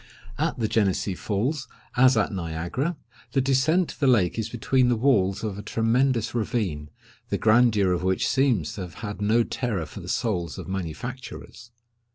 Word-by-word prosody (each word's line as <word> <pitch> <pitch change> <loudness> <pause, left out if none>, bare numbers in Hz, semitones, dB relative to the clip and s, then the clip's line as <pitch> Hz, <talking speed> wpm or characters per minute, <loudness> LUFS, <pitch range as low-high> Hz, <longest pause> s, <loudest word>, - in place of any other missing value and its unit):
At - - 0
the 115 -3 0
Genessee 100 -2 +1
Falls, 120 - -2 0.3
as 130 0 +5
at 105 -1 +1
Niagara, 90 - -3 0.4
the 135 - +3
descent 140 +7 +2
to - - -10
the 140 - +2
lake 110 -5 +3
is 110 0 -2
between 125 +2 +2
the 120 - +3
walls 105 -6 +2
of 105 -2 -3
a - - -4
tremendous 115 +3 +1
ravine, 100 -10 -2 0.4
the - - 0
grandeur 110 -4 +4
of 90 -1 0
which 95 0 +1
seems 125 - +1
to 100 - -6
have 90 -4 -7
had 105 0 -5
no 110 +3 +3
terror 110 -9 -2
for - - -10
the - - -8
souls 85 - -1
of - - -7
manufacturers. 95 +7 -6
110 Hz, 175 wpm, -25 LUFS, 95-125 Hz, 0.4 s, as